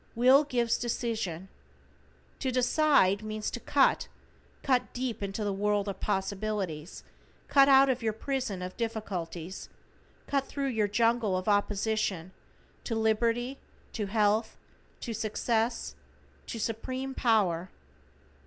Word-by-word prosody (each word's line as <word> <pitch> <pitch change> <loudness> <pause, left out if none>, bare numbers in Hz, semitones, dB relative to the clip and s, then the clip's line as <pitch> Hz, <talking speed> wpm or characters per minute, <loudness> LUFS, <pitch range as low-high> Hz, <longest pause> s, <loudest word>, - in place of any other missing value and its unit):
Will 260 +5 +6
gives 240 -4 0
decision. 220 -7 -3 0.9
To 260 - -1
decide 255 -5 +3
means 215 0 -4
"to - - -4
cut"; 275 +3 +2 0.6
cut 255 -3 +1
deep 245 -4 -3
into 200 +2 -3
the 205 -1 -1
world 205 +1 0
of 195 -2 -4
possibilities, 195 -4 -3 0.4
cut 275 0 +6
out 270 0 +7
of 255 -2 0
your 225 -1 +1
prison 225 -4 -3
of 180 0 -6
difficulties, 190 -7 -4 0.6
cut 275 -1 -1
thru 280 -1 -3
your 220 -6 +1
jungle 230 -2 +2
of 185 - -5
opposition 205 -3 0 0.5
to 230 - -3
liberty, 230 +4 +1 0.3
to 210 -3 -2
health, 215 +1 +1 0.4
to 235 - -4
success, 225 +2 -1 0.5
to - - -5
supreme 255 +5 -3
power. 190 -9 +1
220 Hz, 120 wpm, -29 LUFS, 200-245 Hz, 0.9 s, out